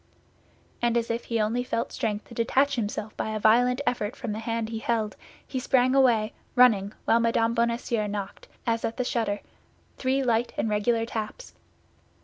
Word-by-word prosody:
And 240 0 +2
as 230 0 0
if 230 +1 -3
he 230 -1 -1
only 225 +3 +1
felt 235 -1 -2
strength 210 -1 -2
to - - -13
detach 265 +5 +2
himself 215 -2 -3
by - - -2
a - - -1
violent 245 +5 +4
effort 220 -2 -1
from 240 -4 -5
the 210 - -3
hand 225 0 -2
he 225 -1 -4
held, 220 -3 -1 0.3
he 260 - -3
sprang 255 0 +3
away, 235 -5 +3 0.2
running, 215 -5 +5
while 230 - +4
Mme. 230 0 +2
Bonacieux 235 -2 0
knocked, 200 -1 -5 0.2
as 230 -1 0
at 225 - -2
the 250 - +1
shutter, 220 -4 -1 0.6
three 265 +1 +1
light 240 -1 +1
and 220 - 0
regular 225 +2 +1
taps. 225 - -6
230 Hz, 175 wpm, -26 LUFS, 215-245 Hz, 0.6 s, running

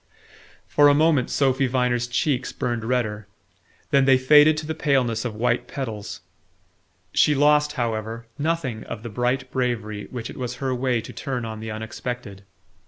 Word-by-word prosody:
For 145 0 +4
a 145 - +5
moment 150 -4 +3
Sophy 135 -1 +2
Viner's 125 -1 0
cheeks 130 +1 0
burned 120 -2 -3
redder; 110 -4 -1 0.6
then 135 -1 +4
they 135 -1 +6
faded 150 +4 +6
to 160 - -4
the 160 - -3
paleness 130 -7 0
of 115 -3 -3
white 120 +2 0
petals. 105 -8 -6 0.9
She 150 - +4
lost, 150 +1 +3
however, 115 -3 -3
nothing 150 -7 -1
of 110 - -7
the 120 - -5
bright 125 +4 -1
bravery 115 -5 -2
which 120 -2 -6
it - - -11
was 125 -1 -4
her 130 +1 -2
way 125 -2 0
to - - -10
turn 125 -4 -4
on 110 -1 -6
the 110 0 -6
unexpected. 110 -1 -6
125 Hz, 165 wpm, -23 LUFS, 115-135 Hz, 0.9 s, they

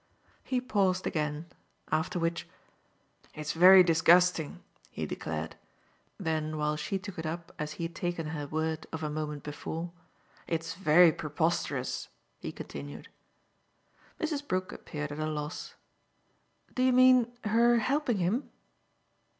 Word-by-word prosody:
He 255 - 0
paused 195 -7 +1
again; 150 0 -2 0.5
after 160 +5 0
which, 165 0 -1 0.9
"It's 150 0 -3
very 185 +3 +9
disgusting!" 170 -1 +3 0.3
he - - -4
declared. 80 0 -5 0.6
Then 155 -1 -2
while 150 0 0
she 170 +6 -2
took 190 -2 -8
it 160 - -4
up 170 +1 -5
as 150 0 -3
he 170 - -6
had 165 0 -4
taken 175 -2 -3
her 145 -2 -4
word 160 +1 -2
of 160 -1 -5
a 150 - -2
moment 150 -1 -4
before, 160 +3 -5 0.6
"It's 165 0 -2
very 165 -1 +6
preposterous," 160 +3 -2 0.3
he - - -5
continued. - - -8 1.1
Mrs. 300 -3 -2
Brook 185 -3 -1
appeared 150 -1 -6
at 145 - -6
a 155 - -1
loss. 150 +1 -5 1.0
"Do 255 - -1
you 255 0 +4
mean 255 -1 +6
her 235 +2 +4
helping 255 0 +1
him?" 195 +9 0
165 Hz, 135 wpm, -30 LUFS, 155-195 Hz, 1.1 s, very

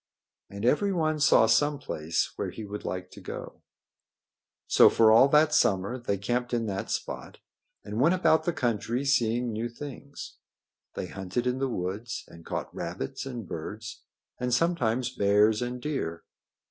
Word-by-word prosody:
And 100 +3 -5
everyone 155 +1 +2
saw 125 - +6
some 145 +7 +3
place 80 - -2
where - - -3
he 110 - -7
would 105 +1 -7
like 90 0 -5
to - - -12
go. - - -8 1.0
So - - +7
for 110 -1 +5
all 115 +5 +7
that 150 +2 +4
summer 100 +1 +2
they 100 -4 -1
camped 120 +5 -1
in 115 -1 -1
that 100 -2 -4
spot - - -4 0.5
and 105 +3 -3
went 165 +6 +5
about 160 -3 +3
the 175 - +2
country 120 -2 -1
seeing 120 -3 +1
new 110 +2 -3
things. 140 +3 -9 0.6
They - - -3
hunted 95 +6 -4
in 125 +1 0
the 135 0 0
woods 100 +3 -4
and 85 0 -13
caught - - -5
rabbits 65 - -5
and 120 -7 -6
birds 105 +8 -7 0.4
and 125 0 -1
sometimes 125 -4 +1
bears 105 +2 +3
and 125 0 -3
deer. 125 - -3
120 Hz, 160 wpm, -28 LUFS, 105-135 Hz, 1.0 s, So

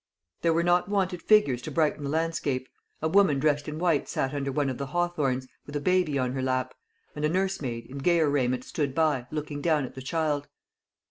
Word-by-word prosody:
There 165 - +3
were 165 +1 +2
not 175 +1 +2
wanted 185 -4 0
figures 210 - +4
to - - -6
brighten 155 -2 +1
the 140 - -2
landscape. 155 -4 -1 0.4
A - - +3
woman 180 -4 +4
dressed 145 0 +1
in 150 0 -4
white 165 -4 +1
sat 135 - -1
under 140 -1 -2
one 145 +1 0
of 130 -1 -3
the 140 - -3
hawthorns, 150 -6 0 0.2
with 145 - -8
a - - +1
baby 180 -2 +2
on 130 -2 0
her 130 0 -3
lap; 130 0 -1 0.4
and 150 - -4
a 150 - +3
nursemaid, 155 -11 -1
in 135 +4 -8
gayer 165 +2 +3
raiment, 130 -3 +1
stood 140 -2 -2
by, 150 -6 +1
looking 150 -1 -4
down 155 -4 +2
at - - -9
the 130 - -8
child. 145 0 -1
150 Hz, 210 wpm, -27 LUFS, 135-165 Hz, 0.4 s, figures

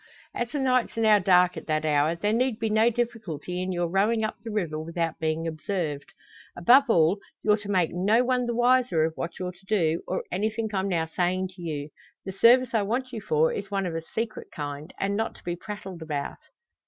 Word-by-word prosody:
As 240 -1 -2
the 295 - -4
nights 255 -4 +1
are - - 0
now 215 -2 +6
dark 180 -1 +4
at - - -8
that 155 0 0
hour, 150 +2 +2
there 205 +5 0
need 245 0 +1
be 225 -2 -2
no 220 +2 +4
difficulty 220 -8 -3
in 185 +1 -2
your 175 -1 0
rowing 210 +6 +1
up 215 - -2
the 230 - -6
river 175 -8 -2
without 165 0 -3
being 160 +1 -1
observed. 155 -2 -3 0.5
Above 250 +11 +6
all, 175 0 +4 0.2
you're 210 -1 +4
to 205 -1 -9
make 180 -5 +2
no 205 +7 +3
one 250 -1 +1
the 235 - -1
wiser 245 -8 +3
of 160 - -2
what 170 - -5
you're 180 -1 -3
to 185 +2 -23
do, 170 -6 +1
or 185 - -2
anything 220 +3 -1
I'm 190 0 0
now 165 -3 0
saying 180 +3 -1
to 185 -1 -14
you. 150 -3 -4 0.4
The 190 - -4
service 240 +5 +5
I 220 - +3
want 250 +5 -2
you 220 - -4
for 160 -6 +2
is 200 -1 -5
one 195 -1 -1
of 175 - -3
a 165 - -3
secret 220 +6 -5
kind, 145 +2 -6
and 200 +1 0
not 225 +2 -2
to - - -17
be 175 0 -3
prattled 190 -2 -8
about." 150 -3 -4
190 Hz, 220 wpm, -26 LUFS, 165-225 Hz, 0.5 s, now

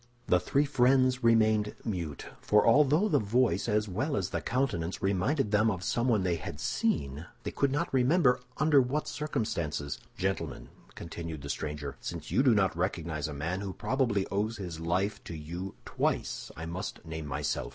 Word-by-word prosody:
The 90 - +4
three 140 +9 +1
friends 130 -2 +3
remained 110 -2 +3
mute—for 90 - 0
although 150 - +5
the 150 -8 +3
voice 110 -2 +1
as 105 0 +1
well 120 - -1
as 95 -1 -2
the - - -1
countenance 100 -11 -1
reminded 100 - +1
them 110 +1 +4
of 95 -4 -3
someone 120 0 +1
they 90 -2 +1
had 75 -1 -7
seen, 70 +1 -1 0.2
they - - -3
could 140 -1 +1
not 145 0 -1
remember 130 +1 +4 0.2
under 150 -2 +5
what 135 +5 -1
circumstances. 85 - -2 0.2
"Gentlemen," 95 +1 -2 0.3
continued 85 -3 -6
the 70 - -6
stranger, 75 -1 -4
"since - - -6
you 130 - +4
do 130 -4 +5
not 95 -4 +2
recognize 85 -4 -2
a 75 - -5
man 80 +7 -2
who 100 -2 -4
probably 110 -3 0
owes 105 +3 -1
his 90 -5 -6
life 90 +5 -1
to 85 - -6
you 85 +5 -6
twice, - - -1
I 80 - -5
must 90 +2 -5
name 80 -1 -5
myself. 70 -3 -2
100 Hz, 170 wpm, -30 LUFS, 85-125 Hz, 0.3 s, although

